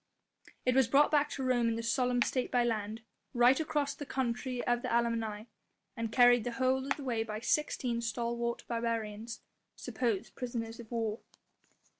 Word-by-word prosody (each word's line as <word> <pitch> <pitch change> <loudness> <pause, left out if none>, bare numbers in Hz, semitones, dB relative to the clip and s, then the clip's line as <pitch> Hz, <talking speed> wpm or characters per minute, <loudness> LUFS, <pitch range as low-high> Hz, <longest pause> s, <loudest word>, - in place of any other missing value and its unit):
It 250 - +3
was 265 -2 +4
brought 280 +5 +4
back 295 -1 +3
to 270 - -4
Rome 245 -2 +2
in 230 0 -2
solemn 245 +1 +2
state 255 -2 -1
by 245 -1 +2
land, 220 -1 -2 0.3
right 245 +3 +5
across 295 -2 0
the - - -7
country 255 -2 -2
of 240 0 +1
the - - -3
Allemanni 225 -2 0 0.5
and 230 -2 -3
carried 245 -1 +6
the 245 - -3
whole 260 +2 +1
of 275 - 0
the 290 - -7
way 240 -4 -1
by 215 -1 -4
sixteen 245 -3 0
stalwart 235 +1 -2
barbarians 230 -1 -3 0.3
supposed 230 -6 -2
prisoners 235 -2 -5
of 230 -2 -10
war. 225 -2 -2
235 Hz, 165 wpm, -32 LUFS, 230-255 Hz, 0.5 s, carried